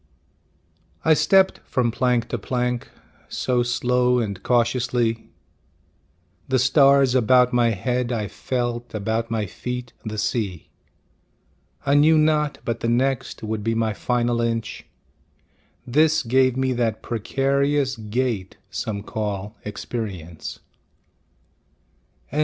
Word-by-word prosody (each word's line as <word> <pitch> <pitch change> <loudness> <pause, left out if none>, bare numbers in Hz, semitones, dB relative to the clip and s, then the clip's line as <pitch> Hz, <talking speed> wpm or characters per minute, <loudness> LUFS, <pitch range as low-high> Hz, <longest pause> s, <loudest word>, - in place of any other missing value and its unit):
I 160 - +6
stepped 190 +5 +4
from 120 -2 -1
plank 125 -1 +1
to 120 - -2
plank 125 +2 -2 0.4
So 125 -1 0
slow 125 +1 +2
and 100 -5 -2
cautiously; 120 -1 0 1.2
The 130 - +2
stars 135 0 +5
about 125 0 +4
my 120 -1 +4
head 120 +4 -1
I 110 -4 -1
felt, 120 +1 -3
About 110 +2 -1
my 110 -2 -1
feet 125 +4 -6
the 110 -1 -5
sea. 100 -6 -2 1.2
I 140 - +2
knew 155 +2 +5
not 155 -1 +2
but 115 -1 -2
the 115 - -1
next 130 0 0
Would 110 -1 -3
be 115 +1 0
my 110 -1 0
final 120 +1 0
inch, 115 -2 -3 1.0
This 155 +5 +3
gave 130 +1 +2
me 130 0 +1
that 115 -3 -1
precarious 135 +4 0
gait 110 -3 -2
Some 100 -3 -4
call 105 -1 -4
experience. 100 -6 -6 1.7
LIV. 150 - 0
120 Hz, 115 wpm, -23 LUFS, 110-130 Hz, 1.7 s, I